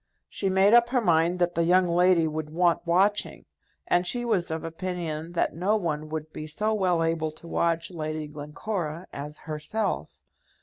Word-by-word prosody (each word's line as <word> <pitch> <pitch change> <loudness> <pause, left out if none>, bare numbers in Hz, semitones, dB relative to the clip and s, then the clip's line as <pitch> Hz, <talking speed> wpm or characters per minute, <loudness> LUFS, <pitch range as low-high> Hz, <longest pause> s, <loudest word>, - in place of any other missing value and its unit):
She 195 - -2
made 190 +3 +4
up 240 0 +6
her 250 0 +2
mind 170 -4 +2
that 175 -1 +1
the 170 - +1
young 180 +2 +4
lady 175 -1 +4
would 155 0 -4
want 170 +2 +1
watching, 195 +5 +1 0.4
and 175 0 +2
she 240 +3 -1
was 195 -7 0
of 160 0 -3
opinion 165 -1 -4
that 170 - 0
no 185 +6 +1
one 155 -6 -2
would 155 0 -5
be 155 - -6
so 210 +8 0
well 180 -5 +2
able 165 -1 0
to 170 - -13
watch 170 +1 0
Lady 155 -2 -4
Glencora 155 +3 -5
as 150 +2 -6
herself. 160 +8 -4
170 Hz, 175 wpm, -26 LUFS, 155-185 Hz, 0.4 s, up